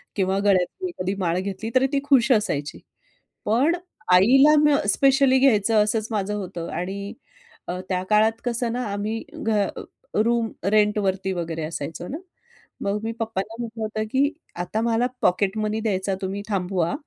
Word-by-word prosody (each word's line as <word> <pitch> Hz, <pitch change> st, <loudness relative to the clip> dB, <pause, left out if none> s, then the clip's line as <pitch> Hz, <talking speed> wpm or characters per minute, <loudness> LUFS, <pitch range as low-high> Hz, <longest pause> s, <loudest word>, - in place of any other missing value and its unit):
किंवा 190 Hz, -1 st, +1 dB
गळ्यातली 200 Hz, -, +1 dB
एखादी 190 Hz, -, -3 dB
माळ 175 Hz, -2 st, 0 dB
घेतली 195 Hz, +3 st, -4 dB
तरी 265 Hz, +1 st, +4 dB
ती 280 Hz, -, +3 dB
खुश 270 Hz, -3 st, +4 dB
असायची. 180 Hz, -, 0 dB, 0.7 s
पण 265 Hz, +10 st, +3 dB, 0.4 s
आईला 270 Hz, +11 st, +6 dB
म 295 Hz, -1 st, +5 dB
स्पेशली 270 Hz, +2 st, +4 dB
घ्यायचं 220 Hz, -4 st, +4 dB
असंच 215 Hz, +1 st, -1 dB
माझं 210 Hz, -1 st, -1 dB
होतं 180 Hz, -4 st, -5 dB
आणि 200 Hz, +2 st, -5 dB, 0.5 s
अ, 180 Hz, +1 st, -3 dB
त्या 185 Hz, -1 st, 0 dB
काळात 220 Hz, +2 st, +3 dB
कसं 240 Hz, -1 st, -1 dB
ना 250 Hz, -, -2 dB
आम्ही 215 Hz, +2 st, -3 dB, 0.2 s
घ 215 Hz, -2 st, +2 dB, 0.6 s
रूम 230 Hz, -1 st, +1 dB, 0.2 s
रेंट 210 Hz, 0 st, +3 dB
वरती 190 Hz, -1 st, -1 dB
वगैरे 165 Hz, -2 st, -4 dB
असायचो 160 Hz, +2 st, -6 dB
ना. 295 Hz, -, -5 dB, 0.6 s
मग 200 Hz, +1 st, 0 dB
मी 225 Hz, -, -2 dB
पप्पांना 220 Hz, -1 st, -3 dB
म्हटलं 225 Hz, -1 st, -5 dB
होतं, 215 Hz, 0 st, -2 dB
की 280 Hz, +3 st, +2 dB, 0.3 s
"आता 215 Hz, +5 st, -2 dB
मला 235 Hz, +1 st, +1 dB, 0.2 s
पॉकेट 190 Hz, +3 st, +1 dB
मनी 215 Hz, 0 st, -1 dB
द्यायचा 195 Hz, -2 st, -1 dB
तुम्ही 195 Hz, +1 st, -3 dB
थांबवा 180 Hz, -3 st, 0 dB
210 Hz, 155 wpm, -23 LUFS, 190-235 Hz, 0.7 s, आईला